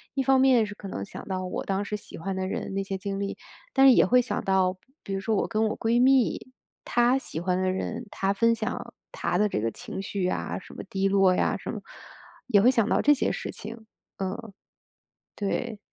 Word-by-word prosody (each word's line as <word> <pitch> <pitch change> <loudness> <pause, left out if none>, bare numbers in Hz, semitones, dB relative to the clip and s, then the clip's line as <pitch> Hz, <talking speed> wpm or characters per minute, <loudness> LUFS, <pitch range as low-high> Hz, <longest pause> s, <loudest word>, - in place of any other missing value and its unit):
一 270 - +1
方 265 0 +4
面 255 -4 +5
是 205 - -7
可 205 - -9
能 100 - -5
想 - - -10
到 185 -1 -2
我 180 - -3
当 195 +1 -1
时 210 - -3
喜 - - -11
欢 190 +3 -4
的 190 0 -2
人 195 - -4
那 195 0 -1
些 195 0 -4
经 195 +1 -4
历， 200 0 -3 0.4
但 270 0 +6
是 265 - +9
也 - - +6
会 250 +1 +5
想 250 - -3
到， 190 -1 +2 0.3
比 195 - -5
如 195 - -1
说 215 +3 0
我 - - +1
跟 220 0 +1
我 215 - -3
闺 235 +2 +2
蜜， 255 -1 +3 0.3
她 240 +2 +3
喜 160 - -6
欢 180 +1 0
的 185 0 +1
人， 225 +5 -4
她 195 0 0
分 230 +3 +3
享 - - -4 0.2
她 180 - -1
的 210 - +4
这 - - -1
个 115 +2 0
情 190 - -7
绪 195 -1 -3
呀， 180 - -1
什 - - -14
么 - - -6
低 195 0 +1
落 195 -1 +4
呀， - - +1
什 - - -6
么， - - -6 0.7
也 210 -5 +5
会 245 +5 +6
想 230 -5 +2
到 - - +3
这 295 - +6
些 280 - 0
事 - - -4
情， 225 +1 -9 0.3
嗯。 200 +2 -5 0.8
对。 210 +1 -2
200 Hz, 245 characters per minute, -27 LUFS, 190-235 Hz, 0.8 s, 是